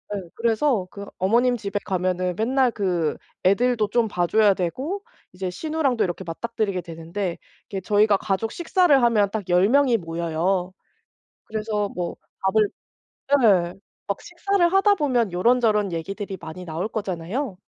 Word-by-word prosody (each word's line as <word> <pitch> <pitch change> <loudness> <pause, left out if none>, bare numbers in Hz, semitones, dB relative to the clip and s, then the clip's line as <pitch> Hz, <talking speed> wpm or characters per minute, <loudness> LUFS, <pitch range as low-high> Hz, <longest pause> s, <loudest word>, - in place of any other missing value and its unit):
예. 185 -4 -6
그래서 230 -3 +1
그 200 0 -8
어머님 240 +6 +2
집에 205 -1 -3
가면은 185 -1 0
맨날 255 +2 +2
그 180 -7 -1 0.3
애들도 215 +3 +2
좀 235 -2 +2
봐 175 -4 0
줘야 210 +1 +4
되고 270 - -3 0.3
이제 185 0 -4
시누랑도 285 - 0
이렇게 180 +1 -4
맞닥뜨리게 200 +2 -2
되는데. 170 +2 -5 0.3
이게 195 -2 -5
저희가 210 +2 +3
가족 220 +2 -2
식사를 345 -3 +3
하면 215 -4 +3
딱 205 -4 -4
10 180 +2 +4
명이 270 -1 +4
모여요. 170 +1 -1 0.7
그래서 215 -1 -2
뭐 175 -3 -4 0.3
밥을 205 +2 +3 0.8
예, 180 -5 +4 0.3
막 200 - -2
식사를 355 0 0
하다 390 +2 +5
보면 245 - +1
요런저런 210 -1 +2
얘기들이 195 +4 -5
많이 165 +3 -8
나올 165 +4 -3
거잖아요. 200 - -3
205 Hz, 310 characters per minute, -23 LUFS, 180-235 Hz, 0.8 s, 하다